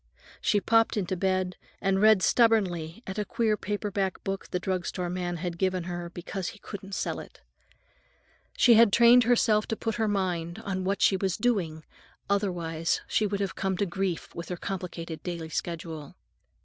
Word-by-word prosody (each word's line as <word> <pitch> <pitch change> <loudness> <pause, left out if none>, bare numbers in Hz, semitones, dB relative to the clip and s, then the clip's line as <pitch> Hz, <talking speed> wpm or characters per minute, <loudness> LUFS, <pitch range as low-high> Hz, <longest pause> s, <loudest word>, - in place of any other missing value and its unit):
She 205 - +3
popped 225 +2 +3
into 190 -2 -1
bed 185 0 0 0.2
and 195 0 +1
read 215 -3 +6
stubbornly 200 -5 +2
at 190 +2 -5
a - - +1
queer 220 +1 +1
paper 205 0 -3
book 195 0 -2
the 180 - -1
drug 185 -1 -2
store 180 -2 -3
man 175 -1 -2
had 170 0 -4
given 185 -2 +1
her 175 0 -5
because 175 +1 -5
he - - -6
couldn't 195 -1 -8
sell - - -2
it. - - -12 1.2
She 240 - +7
had 230 -2 +7
trained 235 +2 +7
herself 225 -3 +3
to 225 - -1
put 225 0 -3
her 220 -1 +1
mind 180 -4 -1
on 185 -1 -2
what 195 +1 0
she 190 - +4
was 190 -2 -1
doing, 185 -10 0 0.5
otherwise 170 -5 0
she 215 - +1
would 200 0 -2
have 195 -1 -1
come 190 -1 -1
to 200 - +1
grief 190 -1 -3
with 170 -1 -7
her 180 - -3
complicated 170 -4 -5
daily 170 -3 -5
schedule. 160 -3 -5
190 Hz, 175 wpm, -28 LUFS, 175-210 Hz, 1.2 s, She